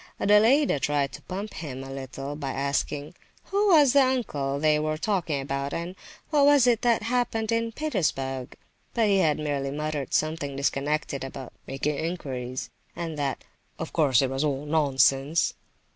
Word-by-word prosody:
Adelaida 220 - +4
tried 145 -1 0
to - - -10
pump 200 +3 -6
him 135 -5 -6
a 135 - -8
little 135 +1 -6
by 145 -2 -4
asking, 140 +2 -2 0.3
"who 405 +1 +1
was 300 -8 +6
the 280 - +6
uncle 150 - 0
they 155 0 +3
were 155 0 -1
talking 170 -5 -1
about, 140 +1 -3
and 170 +2 -4 0.4
what 295 -2 +4
was 285 -3 +6
it 240 -3 +3
that 235 -2 +2
had 235 +3 -1
happened 225 -2 0
in 230 0 0
Petersburg?" 150 - -2 0.4
But 225 -3 +3
he 195 -1 +4
had 155 -5 +3
merely 145 -3 -2
muttered 150 -1 -3
something 155 -3 -1
disconnected 140 +1 -1
about 135 -1 -8
"making 140 +2 -2
inquiries," 130 -7 -4 0.2
and 165 -2 -4
that 135 -3 -2 0.3
"of - - -6
course 140 -5 +4
it 130 - -1
was 135 +2 -1
all 145 -1 -1
nonsense." 140 0 +2
150 Hz, 165 wpm, -26 LUFS, 135-210 Hz, 0.4 s, was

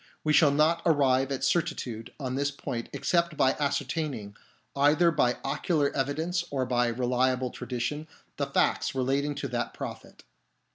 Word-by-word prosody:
We 155 - +2
shall 150 -1 +6
not 155 +4 +3
arrive 135 -4 +3
at 135 - -2
certitude 140 -9 -1
on 130 -3 -3
this 140 +2 0
point 125 -4 -5
except 170 -3 0
by 130 - +4
ascertaining, 140 -7 -2 0.4
either 150 +5 +4
by 125 -6 +2
ocular 145 +1 0
evidence 160 +6 -1
or 135 -3 -1
by 120 -1 +1
reliable 125 +1 0
tradition, 130 +5 -4 0.3
the - - -1
facts - - +1
relating 140 +3 0
to 140 - -3
that 120 -1 -3
prophet. - - -8
140 Hz, 145 wpm, -28 LUFS, 125-155 Hz, 0.4 s, shall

